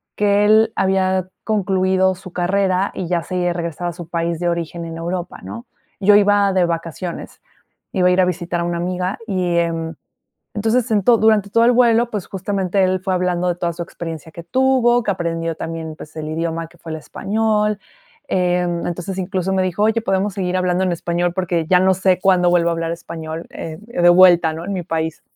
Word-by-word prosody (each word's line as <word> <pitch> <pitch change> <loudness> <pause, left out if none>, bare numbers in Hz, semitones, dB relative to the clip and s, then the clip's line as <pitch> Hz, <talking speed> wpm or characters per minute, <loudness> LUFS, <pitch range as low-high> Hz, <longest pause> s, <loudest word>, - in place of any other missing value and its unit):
que 205 0 +3
él 220 +1 +4
había 190 -1 +1 0.2
concluido 190 -2 +1
su 185 0 -12
carrera 190 +1 +1
y 180 - -4
ya 170 -1 0
se 175 0 -1
regresaba 170 0 -3
a - - -11
su 175 -1 -9
país 170 -1 -2
de 175 - -1
origen 170 0 -3
en 165 0 -7
Europa, 175 +1 -4
¿no? 100 +5 -8 0.3
Yo 205 +1 +5
iba 205 -1 +4
de 185 -2 +3
vacaciones. 170 +1 -5 0.5
Iba 185 -2 +3
a - - +3
ir 185 +1 +4
a - - +4
visitar 175 -1 -2
a - - -1
una 175 0 -2
amiga 180 +2 -2
y 180 -4 0
en 165 -1 -1 0.6
entonces, 225 +3 +1 0.2
durante 220 -3 +4
todo 230 +3 +3
el 240 - +5
vuelo, 235 -1 +3
pues, 210 -5 -4
justamente 195 0 -1
él 185 0 +2
fue 190 - 0
hablando 180 -1 0
de 175 - +1
toda 170 -1 -2
su 170 +1 -5
experiencia 165 -2 -8
que 170 - -9
tuvo, 250 +3 +2
que 200 - +1
aprendió 165 -2 -3
también, 160 0 -6
pues, 155 0 -12
el 155 -1 -5
idioma 165 +1 -3
que 175 - -21
fue 165 - -10
el 160 - -4
español. 210 +4 -1 0.5
Eh, 180 -1 +1 0.2
entonces, 180 +2 -4
incluso 190 0 -2
me 190 -1 +2
dijo: 185 +3 0
"Oye, 220 +1 +2
¿podemos 195 -1 0
seguir 185 -2 -1
hablando 180 0 +1
en 185 - 0
español? 175 +1 -1
Porque 175 -3 -1
ya 180 - +5
no 190 0 +4
sé 185 0 +2
cuándo 180 -2 +3
vuelvo 170 -1 +3
a - - 0
hablar 165 0 -2
español, 165 -1 -7
eh, 160 -1 -7
de 210 -6 +1
vuelta, 175 -2 +6
¿no?, 160 +1 -7
en 200 - -4
mi 185 -2 -2
país". 160 -1 -3
180 Hz, 200 wpm, -19 LUFS, 170-195 Hz, 0.6 s, vuelta